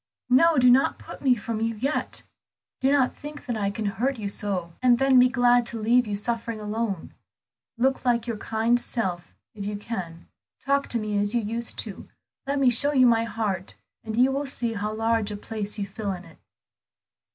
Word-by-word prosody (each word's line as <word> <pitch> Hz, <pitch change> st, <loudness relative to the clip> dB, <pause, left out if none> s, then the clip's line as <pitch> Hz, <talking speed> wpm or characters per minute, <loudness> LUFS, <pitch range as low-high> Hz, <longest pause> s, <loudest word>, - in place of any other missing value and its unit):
"No, 325 Hz, +5 st, +5 dB
do 250 Hz, -1 st, +6 dB
not 260 Hz, +2 st, +3 dB
put -, -, -11 dB
me 260 Hz, -3 st, +4 dB
from 225 Hz, 0 st, -4 dB
you 225 Hz, 0 st, 0 dB
yet; 275 Hz, +8 st, -2 dB, 0.6 s
do 265 Hz, +1 st, +2 dB
not 275 Hz, -3 st, +2 dB
think 295 Hz, 0 st, -9 dB
that 245 Hz, -4 st, -2 dB
I 205 Hz, -2 st, 0 dB
can 210 Hz, +2 st, -4 dB
hurt 245 Hz, +7 st, -1 dB
you 210 Hz, -2 st, -4 dB
so, 190 Hz, -4 st, -3 dB
and 250 Hz, -1 st, +5 dB
then 270 Hz, 0 st, +5 dB
be 250 Hz, -, +7 dB
glad 245 Hz, -1 st, +4 dB
to 235 Hz, -1 st, -5 dB
leave 240 Hz, +2 st, +3 dB
you 205 Hz, -, -2 dB
suffering 230 Hz, +1 st, -2 dB
alone. 210 Hz, -3 st, -3 dB, 0.6 s
Look 265 Hz, +3 st, +1 dB
like 240 Hz, -2 st, +1 dB
your 235 Hz, -2 st, -3 dB
kind 225 Hz, +3 st, +1 dB
self 190 Hz, -8 st, -2 dB, 0.2 s
if 205 Hz, -, -7 dB
you 205 Hz, +1 st, -3 dB
can; 185 Hz, -6 st, -6 dB, 0.3 s
talk 280 Hz, 0 st, 0 dB
to 240 Hz, -, 0 dB
me 210 Hz, -1 st, -1 dB
as 205 Hz, +3 st, 0 dB
you 235 Hz, -, +2 dB
used 230 Hz, +2 st, -3 dB
to; 205 Hz, -4 st, -9 dB, 0.4 s
let 280 Hz, +1 st, 0 dB
me 265 Hz, -3 st, +4 dB
show 285 Hz, +5 st, +3 dB
you 260 Hz, -2 st, +5 dB
my 230 Hz, -1 st, +4 dB
heart 210 Hz, -5 st, -3 dB, 0.3 s
and 220 Hz, 0 st, -5 dB
you 255 Hz, +2 st, +5 dB
will 280 Hz, +1 st, -2 dB
see 235 Hz, -4 st, -1 dB
how 210 Hz, 0 st, -3 dB
large 225 Hz, -1 st, 0 dB
a 205 Hz, -, -5 dB
place 210 Hz, 0 st, -4 dB
you 200 Hz, -, -2 dB
fill 200 Hz, 0 st, -4 dB
in 180 Hz, 0 st, -9 dB
it. 165 Hz, -, -17 dB
230 Hz, 205 wpm, -25 LUFS, 210-250 Hz, 0.6 s, be